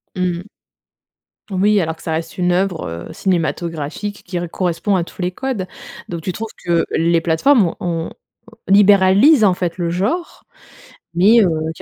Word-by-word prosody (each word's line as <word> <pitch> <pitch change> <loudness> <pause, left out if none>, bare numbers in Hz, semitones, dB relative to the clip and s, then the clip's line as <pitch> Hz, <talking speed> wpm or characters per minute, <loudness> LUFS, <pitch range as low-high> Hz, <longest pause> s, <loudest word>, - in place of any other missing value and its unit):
Mmh. 180 -2 -1 1.1
Oui, 200 +2 +3
alors 160 -1 -3
que - - -17
ça 160 - -2
reste 165 +1 -4
une 180 -1 +1
œuvre, 180 -2 -1 0.2
heu, - - -9
cinématographique 170 +2 -3
qui 180 -1 -4
re 175 -1 -5
correspond 185 +3 -1
à 180 - +1
tous 175 - -10
les 180 0 -1
codes. 230 -3 -4 0.4
Donc 170 -2 -5
tu 185 - -3
trouves 220 +4 -6 0.2
que 170 -1 +2
les 170 +1 +2
plateformes 175 - +3
ont, 165 -2 -2 0.4
heu, 225 -3 -3
libéralisent, 205 +7 +6
en 195 -3 +5
fait, 180 -1 -3
le 170 -2 -1
genre. 210 - -2 0.7
Mais 200 +7 +5
heu, - - +4 0.3
qu'il - - -13
180 Hz, 170 wpm, -18 LUFS, 170-205 Hz, 1.1 s, libéralisent